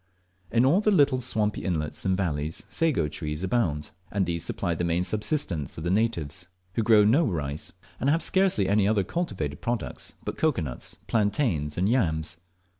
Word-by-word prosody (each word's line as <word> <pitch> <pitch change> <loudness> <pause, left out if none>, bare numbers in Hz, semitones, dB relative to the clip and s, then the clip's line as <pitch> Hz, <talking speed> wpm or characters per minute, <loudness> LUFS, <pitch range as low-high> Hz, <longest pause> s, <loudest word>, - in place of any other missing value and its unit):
In 120 +2 +3
all 165 +10 +4
the 215 - +2
little 145 -9 +4
swampy 110 -4 0
inlets 80 -3 -2
and 95 -1 +2
valleys 80 -4 -2
sago 155 - +1
trees 75 +2 -4
abound, 90 -8 0 0.2
and 100 -2 +1
these 85 -1 -2
supply 85 - -2
the 85 - -2
main 85 +1 +1
subsistence 105 - -2
of 80 - -5
the 85 - 0
natives, 95 -6 0 0.3
who 115 - 0
grow 110 -1 +6
no 125 +11 +4
rice, 80 - -3 0.3
and 135 - +1
have 165 +3 +2
scarcely 185 - +3
any 100 0 +3
other 105 -2 +2
cultivated 95 - -3
products 120 -1 -3
but - - -4
cocoa 150 - +2
nuts, 60 -5 -4
plantains, 105 - 0
and 90 +2 +2
yams. 85 -9 +1
95 Hz, 175 wpm, -27 LUFS, 80-120 Hz, 0.3 s, grow